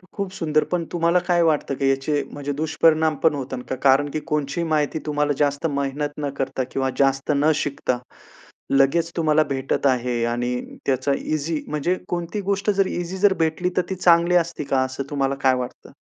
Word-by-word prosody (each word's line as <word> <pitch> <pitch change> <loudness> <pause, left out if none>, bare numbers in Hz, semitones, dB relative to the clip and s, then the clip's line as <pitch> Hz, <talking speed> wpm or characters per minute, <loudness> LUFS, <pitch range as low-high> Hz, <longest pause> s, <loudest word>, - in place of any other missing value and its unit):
खूप 200 -1 -3
सुंदर, 155 -5 +1
पण 175 -1 0
तुम्हाला 170 +1 +2
काय 175 -1 +3
वाटतं 150 -4 +1
की 135 0 +1
याचे 135 +2 0
म्हणजे 145 0 -4
दुष्परिणाम 160 0 +2
पण 160 - +5
होतात 130 -2 -5
का? - - -1
कारण 135 +2 +3
की 155 - -2
कोणचीही 150 +1 -1
माहिती 155 0 0
तुम्हाला 150 -1 0
जास्त 145 +1 0
मेहनत 140 +1 -1 0.2
न - - -1
करता 135 -1 -1
किंवा 135 0 0
जास्त 135 +1 +2
न 150 +3 +3
शिकता 140 -4 -1 0.8
लगेच 160 +5 +3
तुम्हाला 155 -2 +3
भेटत 135 +1 -1
आहे 125 -2 0
आणि 120 +1 -1 0.3
त्याचा 135 +1 +1
इझी 155 +1 -2
म्हणजे 150 +4 0
कोणती 175 +4 -3
गोष्ट 200 +1 0
जर 195 -1 +2
इझी 175 +2 -4
जर 200 +1 +4
भेटली 160 +3 0
तर - - +5
ती 190 - -2
चांगली 175 -1 +4
असते 170 -2 -7
का, 135 -2 +1
असं 130 +1 -4
तुम्हाला 140 -1 0
काय 130 -1 +5
वाटतं? 125 -1 -6
150 Hz, 185 wpm, -22 LUFS, 135-170 Hz, 0.8 s, पण